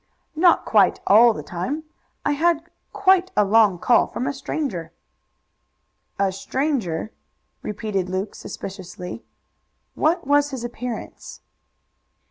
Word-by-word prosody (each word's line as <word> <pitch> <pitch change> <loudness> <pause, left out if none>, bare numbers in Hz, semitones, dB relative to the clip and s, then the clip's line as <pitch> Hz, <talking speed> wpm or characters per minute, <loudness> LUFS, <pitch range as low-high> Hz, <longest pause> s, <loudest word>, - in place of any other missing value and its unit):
"Not 340 +2 +4
quite 200 -4 +3
all 230 +4 +7
the 150 - -6
time. 250 - -4 0.4
I - - +2
had 330 +2 +1 0.2
quite 380 -3 +3
a 210 - +5
long 205 -2 +4
call 240 - +3
from 245 - -4
a 280 - -1
stranger." 205 - -4 1.2
"A 195 -1 +1
stranger!" 215 - -2 0.5
repeated 205 -3 -3
Luke 190 +3 -3
suspiciously. 190 +1 -8 0.7
"What 335 +1 +1
was 290 +1 +3
his 265 -4 -6
appearance?" 240 0 -7
235 Hz, 110 wpm, -22 LUFS, 195-290 Hz, 1.2 s, all